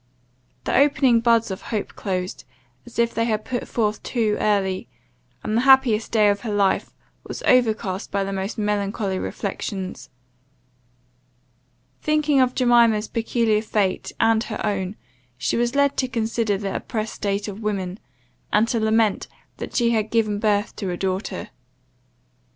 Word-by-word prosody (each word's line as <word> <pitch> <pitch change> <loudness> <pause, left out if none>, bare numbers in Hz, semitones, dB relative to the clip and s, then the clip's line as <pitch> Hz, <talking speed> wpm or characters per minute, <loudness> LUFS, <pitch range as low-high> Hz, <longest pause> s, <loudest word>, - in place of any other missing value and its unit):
The - - -1
opening 275 -4 +4
buds 230 -2 +3
of 190 - -5
hope 215 -3 -3
closed, 185 -2 -4 0.4
as 240 - -12
if 235 0 +2
they 230 - 0
had 215 -2 -1
put 245 -1 -3
forth 215 -2 -1
too 220 -4 0
early, 195 -3 0 0.6
and 215 - -2
the - - +2
the - - +3
happiest 265 -5 +5
day 215 -2 +4
of 200 0 +1
her 225 -1 -4
life 200 -2 +1 0.4
was - - -6
overcast 220 -6 +2
by 200 -1 0
the 195 0 -3
most 195 +3 -3
melancholy 200 -2 -1
reflections. 190 -1 -5 1.9
Thinking 300 -2 +2
of 255 -1 +1
Jemima's 235 -4 +4
peculiar 225 -1 +1
fate 205 -3 -1
and 225 0 +3
her 215 - -4
own, 195 -1 -2 0.4
she - - -1
was 240 +2 0
led 280 0 +2
to 260 - +1
consider 225 -3 -1
the 195 0 -4
oppressed 220 -2 -4
state 200 0 -2
of 205 +1 -7
women, 195 -2 -3 0.5
and 225 - +3
to 230 - +1
lament 220 -1 +2 0.3
that - - -7
she 235 -1 +3
had 220 -2 0
given 215 -3 +1
birth 210 -1 +1
to 195 -4 -3
a 175 - -3
daughter. 190 +2 -3
215 Hz, 155 wpm, -23 LUFS, 200-235 Hz, 1.9 s, happiest